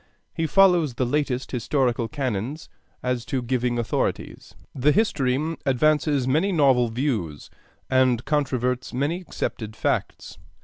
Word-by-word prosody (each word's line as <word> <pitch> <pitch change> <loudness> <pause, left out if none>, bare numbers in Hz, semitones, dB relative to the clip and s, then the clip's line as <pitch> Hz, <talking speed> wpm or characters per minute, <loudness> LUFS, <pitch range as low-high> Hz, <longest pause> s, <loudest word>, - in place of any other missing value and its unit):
He 165 - -1
follows 175 -5 +4
the 130 - 0
latest 130 -1 -1
historical 125 -1 0
canons 130 +3 -4 0.3
as 125 -2 -1
to 130 -2 -2
giving 120 0 0
authorities. 120 -2 -3 0.2
The 140 +3 +2
history 155 - +1
advances 145 0 +2
many 160 +9 +2
novel 135 -8 +3
views, 110 - -3 0.4
and 130 -2 +2
controverts 130 -4 -1
many 150 +7 -1
accepted 110 - -5
facts. - - -3
130 Hz, 120 wpm, -24 LUFS, 125-150 Hz, 0.4 s, follows